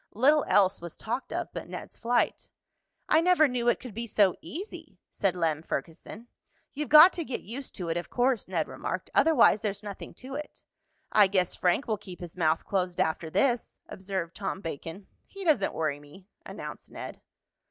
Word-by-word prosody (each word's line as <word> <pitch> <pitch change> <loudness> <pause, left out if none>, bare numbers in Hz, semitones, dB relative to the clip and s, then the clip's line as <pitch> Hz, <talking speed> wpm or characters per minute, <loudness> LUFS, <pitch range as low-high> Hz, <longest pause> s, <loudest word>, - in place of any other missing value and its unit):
Little 285 +7 +4
else 195 -2 +3
was 170 -2 -7
talked 240 +4 -4
of - - -4
but - - -6
Ned's - - -8
flight. 240 +1 0 0.6
"I 315 - +5
never 350 -3 +5
knew 245 -2 -2
it 240 - +3
could 250 -4 -9
be 230 +3 -4
so 200 -4 +3
easy," 380 +7 -8
said 195 -3 0
Lem 160 -3 0
Ferguson. 165 - -6 0.5
"You've 295 +1 -4
got 310 +5 +10
to 340 - -3
get 260 -5 -4
used 255 +6 -7
to 180 -4 -4
it, 165 - 0
of 175 - -5
course," 245 -3 +1
Ned 170 -4 -1
remarked. - - -5
"Otherwise, 315 -9 +5
there's 205 -1 -3
nothing 205 -2 -8
to 260 +2 -9
it." 295 +2 -7 0.5
"I 210 -2 +6
guess 185 -2 +1
Frank 180 +9 +1
will 215 -3 -1
keep 185 -3 -10
his 175 -2 -8
mouth 160 -2 +1
closed 180 -3 -1
after 160 0 0
this," 245 - 0
observed 190 -3 -5
Tom 195 -1 -3
Bacon. 165 +3 -7 0.2
"He 395 0 -9
doesn't 300 - +3
worry 155 -3 -1
me," 145 +6 -16 0.2
announced - - -8
Ned. - - -8
205 Hz, 185 wpm, -28 LUFS, 175-255 Hz, 0.6 s, got